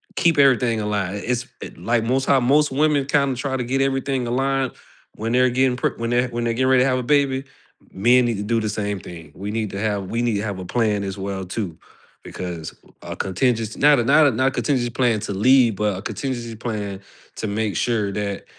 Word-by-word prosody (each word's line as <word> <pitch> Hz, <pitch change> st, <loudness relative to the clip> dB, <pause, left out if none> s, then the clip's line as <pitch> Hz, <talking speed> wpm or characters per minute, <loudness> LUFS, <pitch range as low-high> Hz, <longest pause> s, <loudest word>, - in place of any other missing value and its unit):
keep 165 Hz, -3 st, +2 dB
everything 125 Hz, -5 st, +3 dB
aligned. 100 Hz, -2 st, -2 dB
I -, -, -6 dB
it's 125 Hz, +1 st, -1 dB, 0.3 s
like 115 Hz, -1 st, 0 dB
most 130 Hz, +3 st, 0 dB
how 135 Hz, -, +4 dB
most 145 Hz, +4 st, +3 dB
women 145 Hz, 0 st, +2 dB
kinda 140 Hz, -2 st, +1 dB
try 130 Hz, +1 st, -2 dB
to 125 Hz, -, -2 dB
get 135 Hz, +3 st, -1 dB
everything 135 Hz, -2 st, 0 dB
aligned 135 Hz, +1 st, 0 dB, 0.4 s
when 115 Hz, +2 st, -3 dB
they're 125 Hz, +1 st, +4 dB
getting 125 Hz, 0 st, +1 dB
pre -, -, 0 dB
when 115 Hz, +1 st, -3 dB
they're 120 Hz, +1 st, +2 dB
when 120 Hz, 0 st, -3 dB
they're 115 Hz, -1 st, 0 dB
getting 130 Hz, +2 st, +1 dB
ready 130 Hz, -1 st, +5 dB
to 135 Hz, -, +2 dB
have 130 Hz, 0 st, +1 dB
a -, -, -3 dB
baby. 135 Hz, 0 st, +1 dB, 0.5 s
Men 120 Hz, +5 st, +4 dB
need 115 Hz, -4 st, -1 dB
to 105 Hz, -, -3 dB
do 115 Hz, +2 st, 0 dB
the 110 Hz, -, -2 dB
same 105 Hz, -2 st, -3 dB
thing. 80 Hz, -3 st, -11 dB
We 100 Hz, +2 st, -6 dB
need 110 Hz, -2 st, -2 dB
to 100 Hz, -, -5 dB
have 105 Hz, -2 st, -1 dB
we 115 Hz, +1 st, 0 dB
need 120 Hz, -3 st, 0 dB
to 100 Hz, -, -1 dB
have 100 Hz, -3 st, -4 dB
a 90 Hz, -, -6 dB
plan 105 Hz, -1 st, 0 dB
as 95 Hz, 0 st, -5 dB
well 95 Hz, -1 st, -4 dB
too, 90 Hz, -3 st, -5 dB, 0.5 s
because 85 Hz, -3 st, -6 dB, 0.3 s
a -, -, -7 dB
contingency 110 Hz, +3 st, -1 dB
not 145 Hz, -2 st, +5 dB
a -, -, +2 dB
not 145 Hz, +5 st, +5 dB
a -, -, +3 dB
not 130 Hz, +4 st, +2 dB
a -, -, -8 dB
contingency 130 Hz, -3 st, 0 dB
plan 120 Hz, -3 st, +1 dB
to 105 Hz, -, -4 dB
leave, 120 Hz, 0 st, +4 dB
but 105 Hz, -3 st, 0 dB
a -, -, -6 dB
contingency 120 Hz, -1 st, -4 dB
plan 105 Hz, -4 st, -4 dB, 0.4 s
to 110 Hz, -, -3 dB
make 105 Hz, 0 st, -2 dB
sure 110 Hz, -4 st, 0 dB
that 100 Hz, 0 st, -4 dB
120 Hz, 230 wpm, -22 LUFS, 105-130 Hz, 0.5 s, ready